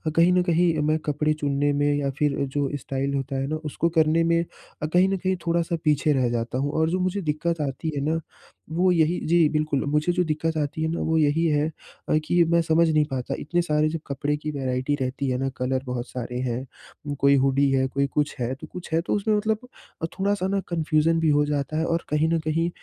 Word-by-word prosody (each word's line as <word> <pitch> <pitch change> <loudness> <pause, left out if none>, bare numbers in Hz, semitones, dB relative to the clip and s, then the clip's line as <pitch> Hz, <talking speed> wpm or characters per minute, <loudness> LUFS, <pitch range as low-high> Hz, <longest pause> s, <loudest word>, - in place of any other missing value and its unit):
कहीं 170 +2 +5
न 180 - +4
कहीं 170 -1 +2
मैं 155 - +3
कपड़े 150 +1 +1
चुनने 145 -1 0
में 145 0 +2
या 145 -1 0
फिर 145 -2 +2 0.2
जो 140 -2 +1
स्टाइल 135 +1 -3
होता 135 0 -3
है 135 0 -1
ना 155 - -2
उसको 165 +3 0
करने 160 +1 +4
में, 170 0 +2 0.4
कहीं 180 +5 +3
न 195 - 0
कहीं 185 +1 0
थोड़ा-सा 170 0 +1
पीछे 150 0 +2
रह 130 -3 +1
जाता 120 +1 -2
हूँ, 145 +2 -1
और 160 0 +1
जो 185 +2 0
मुझे 185 +2 -1
दिक्कत 160 +1 -1
आती 145 +3 -3
है 140 - -1
ना, 165 +1 +1 0.5
वो 180 +3 +2
यही 165 0 +2
जी। 165 -1 +5
बिल्कुल, 155 -2 0
मुझे 150 +4 +1
जो 180 0 +2
दिक्कत 160 0 -1
आती 150 +1 -2
है - - +1
ना 165 - -2
वो 160 0 +1
यही 155 +2 +2
है, 150 +1 +1 0.5
कि 175 +1 +4
मैं 170 0 +4
समझ 165 +1 +3
नहीं 155 -1 +3
पाता 125 -2 -3
इतने 175 +4 0
सारे 155 -2 +1
जो 165 +1 -3
कपड़े 145 +1 -1
की 155 +1 -4
वैराइटी 130 0 -1
रहती 130 +2 -2
है 125 - 0
ना 135 +1 -1
कलर 130 +1 -1
बहुत 125 0 -4
सारे 125 -1 -5
हैं। 130 +3 -6
कोई 140 0 +5
हुडी 135 +1 +3
है 135 -1 +2
कोई 140 +1 0
कुछ 150 +1 -1
है, 125 +1 -1
तो - - -11
कुछ 180 -2 -9
है 165 - +3
तो 170 - -2
उसमें 210 +1 +1
मतलब 220 +3 -1 0.5
थोड़ा-सा 200 -1 +1
ना 200 0 0
कन्फ्यूजन 165 -1 +1
भी 160 -1 +2
हो 145 0 +3
जाता 145 +1 -2
है 160 - +1
और 165 0 0
कहीं 150 +1 +2
न 165 - +2
कहीं 160 +2 0
155 Hz, 225 wpm, -24 LUFS, 140-165 Hz, 0.5 s, कहीं